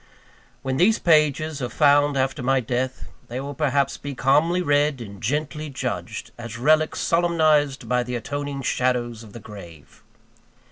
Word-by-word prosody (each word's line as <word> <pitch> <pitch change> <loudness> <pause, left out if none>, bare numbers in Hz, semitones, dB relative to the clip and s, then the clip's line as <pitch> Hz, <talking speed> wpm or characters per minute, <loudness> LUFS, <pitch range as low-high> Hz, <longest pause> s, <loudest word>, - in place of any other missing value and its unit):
When 130 0 -1
these 205 +8 +4
pages 155 -2 +2
are 125 - -2
found 145 0 +3
after 130 0 0
my 135 +1 +2
death, 130 +1 -3 0.2
they 125 +2 -5
will 140 +2 -5
perhaps 140 -2 0
be 140 -1 -6
calmly 165 +8 +2
read 145 -2 +2
and 100 -4 -9
gently 150 +4 -2
judged, 130 - -5
as 115 -1 -7
relics 155 +5 +2
solemnized 155 -5 +2
by 125 0 +1
the 125 0 -4
atoning 140 +3 -4
shadows 120 -3 -1
of 110 -3 -13
the 115 - -8
grave. 85 - -13
140 Hz, 150 wpm, -23 LUFS, 125-150 Hz, 0.2 s, these